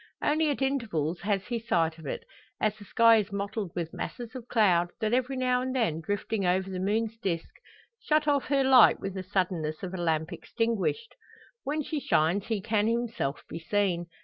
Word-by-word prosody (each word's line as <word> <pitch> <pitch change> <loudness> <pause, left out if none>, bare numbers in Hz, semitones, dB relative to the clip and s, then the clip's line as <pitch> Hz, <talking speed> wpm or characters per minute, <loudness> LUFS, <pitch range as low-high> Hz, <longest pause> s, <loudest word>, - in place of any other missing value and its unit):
Only 310 +1 +2
at 275 -1 -1
intervals 195 - -1
has 195 0 -1
he 240 -1 -2
sight 165 -7 0
of 155 - -9
it, - - -4 0.4
as 215 -1 +1
the 210 -1 -13
sky 230 +2 +5
is 205 -1 -1
mottled 200 -1 -3
with 170 -2 -3
masses 240 -1 -6
of 250 -2 -8
cloud, 180 -8 +3
that 220 0 0
every 260 +1 0
now 250 -1 +1
and 260 +1 -3
then, 190 -11 0
drifting 205 +4 -2
over 190 +1 +1
the 185 - -4
moon's 220 +4 -1
disc, 170 -6 -3 0.5
shut 305 0 +1
off 285 -2 +2
her 275 -1 +2
light 260 -3 +7
with 195 -1 -4
the 190 - -4
suddenness 180 -4 -2
of 185 0 -5
a - - -3
lamp 160 -2 -1
extinguished. 230 - -2 0.5
When 300 +2 -1
she 305 +1 -3
shines 175 - +1
he 220 -3 -1
can 215 0 +1
himself 230 - -2
be 165 - -6
seen. 175 -1 0
210 Hz, 195 wpm, -28 LUFS, 180-245 Hz, 0.5 s, light